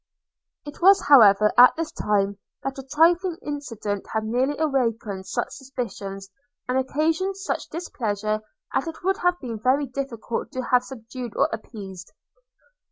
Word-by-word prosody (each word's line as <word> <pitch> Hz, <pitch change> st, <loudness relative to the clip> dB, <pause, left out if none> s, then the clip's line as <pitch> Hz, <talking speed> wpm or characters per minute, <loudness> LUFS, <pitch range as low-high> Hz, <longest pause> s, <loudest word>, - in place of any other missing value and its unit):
It 290 Hz, +3 st, -10 dB
was 390 Hz, +2 st, +7 dB
however 210 Hz, -6 st, +7 dB
at 250 Hz, -, +9 dB
this 330 Hz, -1 st, -3 dB
time 200 Hz, -1 st, 0 dB, 0.2 s
that 270 Hz, 0 st, -4 dB
a 270 Hz, -, -9 dB
trifling 335 Hz, +4 st, +3 dB
incident 230 Hz, -9 st, -4 dB
had 220 Hz, 0 st, 0 dB
nearly 255 Hz, +6 st, 0 dB
awakened 230 Hz, -10 st, -1 dB
such -, -, -2 dB
suspicions, 225 Hz, -7 st, -6 dB, 0.4 s
and 255 Hz, +1 st, +1 dB
occasioned 320 Hz, +8 st, 0 dB
such 390 Hz, -, -3 dB
displeasure, 215 Hz, -, -2 dB, 0.3 s
as 270 Hz, -, 0 dB
it 325 Hz, -, -7 dB
would 385 Hz, +1 st, +1 dB
have 355 Hz, 0 st, +1 dB
been 230 Hz, -5 st, -6 dB
very 260 Hz, +5 st, +2 dB
difficult 250 Hz, -3 st, -4 dB
to 255 Hz, -, -3 dB
have 250 Hz, 0 st, +3 dB
subdued 245 Hz, -2 st, -8 dB
or -, -, +3 dB
appeased. 195 Hz, -4 st, -8 dB
255 Hz, 145 wpm, -24 LUFS, 215-295 Hz, 0.4 s, at